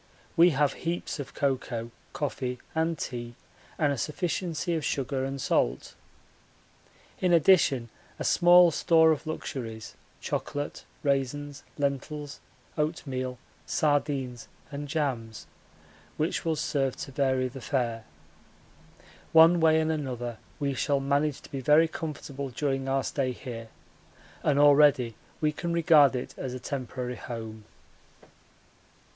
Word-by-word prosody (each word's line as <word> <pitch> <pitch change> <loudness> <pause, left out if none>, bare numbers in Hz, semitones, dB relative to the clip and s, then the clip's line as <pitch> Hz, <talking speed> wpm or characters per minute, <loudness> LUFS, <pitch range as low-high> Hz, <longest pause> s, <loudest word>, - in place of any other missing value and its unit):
We 170 +2 +7
have 145 -2 +2
heaps 170 -1 -3
of 140 - -7
cocoa, 125 -4 -2 0.2
coffee, 130 -3 -3 0.2
and 160 0 0
tea, 120 -3 -5 0.4
and 145 -3 +2
a 135 - -4
sufficiency 170 +2 -2
of 160 -2 -1
sugar 135 -1 -1
and 135 +1 -3
salt. 60 - 0 1.3
In 180 - +2
addition 150 -8 +4 0.3
a - - -4
small 175 0 +6
store 160 -1 +4
of 155 0 -2
luxuries, 115 -8 -5 0.3
chocolate, 145 0 -4 0.2
raisins, 145 +1 -1 0.2
lentils, 145 +1 -3 0.4
oatmeal, 130 -5 -2 0.3
sardines, 140 -5 0 0.2
and 145 +1 -5
jams, 130 -7 -3 0.7
which 155 +4 -1
will 165 -1 +1
serve 135 -3 -1
to - - -7
vary 130 -1 +1
the 130 +1 -9
fare. 120 -4 -1 1.3
One 165 +2 +7
way 160 -1 +5
and 160 0 +1
another 125 -6 -4 0.2
we 140 -1 0
shall 140 +1 +1
manage 140 +1 0
to - - -15
be 135 - -4
very 150 +5 +5
comfortable 140 -4 -5
during 135 +1 -2
our 135 0 +1
stay 130 -2 -1
here, 115 -3 -8 0.7
and 145 -2 +2
already 145 -4 +5 0.3
we 155 -1 +2
can 170 +3 -4
regard 155 -5 +5
it 125 - -4
as 130 -1 -4
a - - -5
temporary 125 -2 -4
home. 110 -2 -7
140 Hz, 125 wpm, -28 LUFS, 130-155 Hz, 1.3 s, We